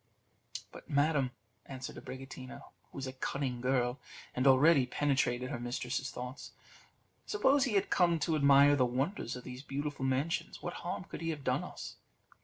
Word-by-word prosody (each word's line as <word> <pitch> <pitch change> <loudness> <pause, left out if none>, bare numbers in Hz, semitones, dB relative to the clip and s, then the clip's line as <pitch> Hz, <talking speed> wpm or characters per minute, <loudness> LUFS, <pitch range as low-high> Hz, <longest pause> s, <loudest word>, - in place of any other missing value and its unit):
"But, - - -12
madam," 145 -2 +2 0.4
answered 130 -1 -6
Abricotina, 130 -1 -8 0.3
who - - -12
was 135 - -3
a 130 - -5
cunning 130 -1 -3
girl, 125 0 +1 0.3
and 125 +2 +1
already 135 0 +6
penetrated 130 -2 0
her 125 - -3
mistress's 125 +2 -2
thoughts, 125 +1 -7 0.7
"suppose 285 -9 +3
he 235 -6 -1
had 195 - +1
come 175 -2 +4
to 160 +2 +1
admire 140 0 +6
the 135 - +3
wonders 130 - -1
of 125 - -8
these 125 0 -7
beautiful 145 0 -4
mansions, 135 +5 -1
what - - -4
harm - - -3
could - - -8
he 165 - -2
have 150 -3 -4
done - - +1
us? - - -8
135 Hz, 165 wpm, -33 LUFS, 125-145 Hz, 0.7 s, already